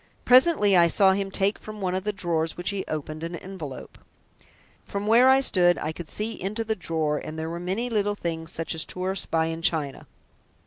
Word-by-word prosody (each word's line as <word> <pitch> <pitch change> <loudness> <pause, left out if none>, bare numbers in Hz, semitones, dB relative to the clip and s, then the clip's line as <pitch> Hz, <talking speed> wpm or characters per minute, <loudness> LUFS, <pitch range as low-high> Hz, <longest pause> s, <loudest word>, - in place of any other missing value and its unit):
Presently 250 - +5
I 170 -1 +6
saw 190 +3 +5
him 195 0 -1
take 195 +2 0
from 215 0 -9
one 185 -2 -2
of 185 +1 -2
the 210 - +1
drawers, 170 -4 -2
which 175 +3 -1
he 200 -1 -3
opened, 155 +1 -5
an 170 +1 -4
envelope. 170 -7 -9 0.8
From 200 0 -5
where 235 +4 +6
I 265 +1 +5
stood 175 -8 +3
I 155 - -3
could 160 0 -8
see 220 +2 -2
into 210 +5 -2
the 220 0 -1
drawer, 160 -5 -1
and 155 - -8
there 160 +1 -4
were 170 - -5
many 190 +7 -2
little 205 -3 0
things 165 -4 -4
such 165 +1 -3
as 160 -1 0
tourists 185 +1 -3
buy 160 -1 +1
in 165 0 -4
China. 155 -5 -1
185 Hz, 210 wpm, -25 LUFS, 165-205 Hz, 0.8 s, I